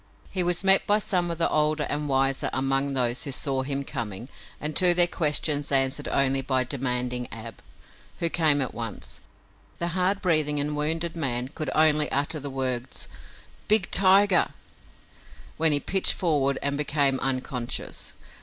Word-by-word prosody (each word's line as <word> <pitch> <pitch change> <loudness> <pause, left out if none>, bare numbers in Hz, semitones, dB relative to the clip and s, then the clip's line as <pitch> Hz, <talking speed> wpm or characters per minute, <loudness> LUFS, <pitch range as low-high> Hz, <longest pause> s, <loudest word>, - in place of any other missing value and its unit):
He 185 - 0
was 175 +1 0
met 195 0 +5
by 205 - +4
some 180 -4 -1
of 170 - -4
the 165 - +2
older 150 0 0
and 150 0 -3
wiser 135 0 +1
among 135 +1 0
those 125 -1 +1
who 140 - -3
saw 135 0 -1
him 140 +1 -3
coming 115 -1 -6 0.3
and 150 +1 -3
to 180 -2 +6
their 175 0 +8
questions 150 -3 0
answered 135 +1 +1
only 135 0 +1
by 130 -1 0
demanding 125 -2 -3
Ab, 115 -1 -9 0.6
who 170 - +1
came 155 -4 +3
at 130 - -2
once. 115 -2 -7 0.6
The 170 - -3
hard 185 +3 -1
breathing 155 -5 +1
and 150 +1 -1
wounded 160 +3 -2
man 125 -5 -2
could 155 -1 -6
only 155 -1 +3
utter 145 +3 -1
the 140 0 -6
words 130 -2 -4 0.6
"Big 215 +1 +2
tiger," 195 0 +4 1.1
when 160 0 +3
he 145 - +1
pitched 190 +7 +1
forward 145 -6 0
and 140 0 -1
became 140 -2 +1
unconscious. 130 -2 -4
145 Hz, 160 wpm, -25 LUFS, 130-165 Hz, 1.1 s, their